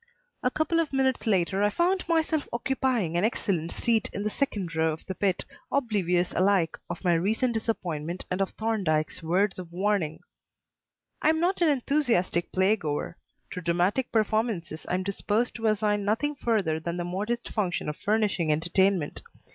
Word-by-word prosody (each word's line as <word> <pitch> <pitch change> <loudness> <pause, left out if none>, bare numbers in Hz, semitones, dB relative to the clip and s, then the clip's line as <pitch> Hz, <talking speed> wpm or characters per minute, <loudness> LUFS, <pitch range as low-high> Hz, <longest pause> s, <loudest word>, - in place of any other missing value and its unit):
A 250 - +2
couple 315 +4 +1
of 325 -3 0
minutes 265 -3 +1
later 190 -1 +2
I 205 - +4
found 350 - 0
myself 320 -2 +1
occupying 245 -7 0
an 175 - +2
excellent 185 -7 0
seat 230 -2 +1
in 200 - -4
the 210 - -1
second 200 - -2
row 160 0 +2
of 155 - -10
the 190 - -4
pit, 190 -1 0 0.3
oblivious 195 -9 +1
alike 185 -3 +2
of 175 +1 -5
my 175 -2 +3
recent 220 +9 +1
disappointment 180 -7 -3
and 180 +2 0
of 195 - +1
Thorndyke's 190 -9 0
words 185 +4 +1
of 175 -2 -8
warning. 180 -4 0 1.0
I - - +4
am 320 0 +2
not 355 +2 +1
an 335 - +5
enthusiastic 245 - +1
play 190 +3 +3
goer. 155 -4 -3 0.4
To 180 - -5
dramatic 180 +9 +1
performances 215 -7 0
I - - +1
am 185 - -1
disposed 205 +4 0
to 225 -1 -1
assign 210 -1 +1
nothing 225 +9 0
further 210 - 0
than 170 +2 -4
the 175 - -2
modest 210 +7 -3
function 190 -8 -1
of 150 - -2
furnishing 205 -6 +1
entertainment. 175 +1 +1
200 Hz, 170 wpm, -27 LUFS, 175-235 Hz, 1.0 s, an